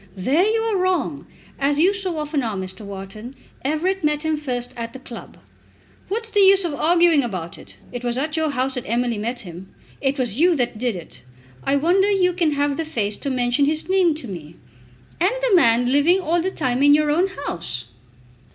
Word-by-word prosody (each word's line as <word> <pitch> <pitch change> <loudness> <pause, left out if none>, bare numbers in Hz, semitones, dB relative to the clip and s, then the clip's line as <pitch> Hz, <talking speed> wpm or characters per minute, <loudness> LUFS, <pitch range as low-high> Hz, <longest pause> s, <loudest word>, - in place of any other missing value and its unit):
"There 270 - +2
you 445 +1 +1
are 450 -3 0
wrong, 370 0 -1 0.3
as 285 +1 +1
you 360 +6 +4
so 380 -4 -3
often 300 -1 -1
are, 225 -4 -2
Mr. 190 +2 -6
Wharton. 200 +5 -8 0.3
Everett 340 +7 -1
met 300 0 +1
him 315 0 +1
first 250 -4 -3
at 230 -1 -6
the 265 - -9
club." 240 -3 -11 0.7
"What's 450 +3 -3
the 415 - +2
use 390 -1 +6
of 330 - -2
arguing 335 -1 +3
about 180 -8 -5
it? - - -14 0.2
It 245 -1 -6
was 240 0 -1
at 305 +3 -2
your 315 -1 0
house 265 -1 -1
that 250 -2 -5
Emily 235 -1 0
met 240 +3 -3
him. 180 -1 -10 0.3
It 275 +1 0
was 245 -5 -1
you 350 +1 +4
that 245 -5 -1
did 240 -3 -1
it. 170 -2 -10 0.4
I 275 - +1
wonder 360 +7 +3
you 370 -3 +2
can 335 -4 +1
have 285 0 0
the 325 - -1
face 215 -9 -2
to 280 - -4
mention 250 +1 +1
his 310 +2 -1
name 370 -4 +3
to 300 -5 -7
me." 165 -5 -8 0.6
"And 365 +7 +2
the 425 - +4
man 245 -5 +4
living 305 +7 +4
all 345 -1 0
the 370 - -1
time 255 -7 -1
in 290 +1 +7
your 300 0 +2
own 350 +5 +2 0.2
house!" 150 - -3
285 Hz, 205 wpm, -22 LUFS, 240-345 Hz, 0.7 s, in